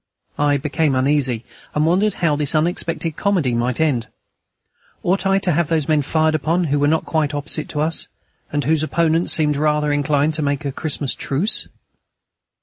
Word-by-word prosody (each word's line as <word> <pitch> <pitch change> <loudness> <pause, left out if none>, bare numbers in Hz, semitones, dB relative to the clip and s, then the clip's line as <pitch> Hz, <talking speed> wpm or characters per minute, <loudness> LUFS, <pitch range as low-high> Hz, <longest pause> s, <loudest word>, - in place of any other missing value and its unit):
I 145 -1 +3
became 150 0 0
uneasy, 130 -3 +1 0.3
and 150 +1 +2
wondered 195 +6 +2
how 165 -4 +1
this 145 +1 -1
unexpected 165 0 -1
comedy 180 -11 +1
might 120 +1 -1
end. 135 -8 +1 1.0
Ought 190 +2 +1
I 195 0 +3
to 190 -2 0
have 165 0 +1
those 160 -3 0
men 155 -2 +3
fired 155 +2 +1
upon 165 +3 +1
who 145 -3 0
were 145 - +3
not 160 +2 +1
quite 155 -2 0
opposite 150 +1 -3
to 150 - -2
us, 160 +1 -1 0.4
and 145 0 -1
whose 155 +1 +2
opponents 165 +1 +1
seemed 150 -2 +2
rather 150 0 +1
inclined 145 +1 +1
to 155 - -2
make 145 +1 -1
a 140 - -1
Christmas 145 -1 -2
truce? 160 +11 0
150 Hz, 175 wpm, -20 LUFS, 145-165 Hz, 1.0 s, I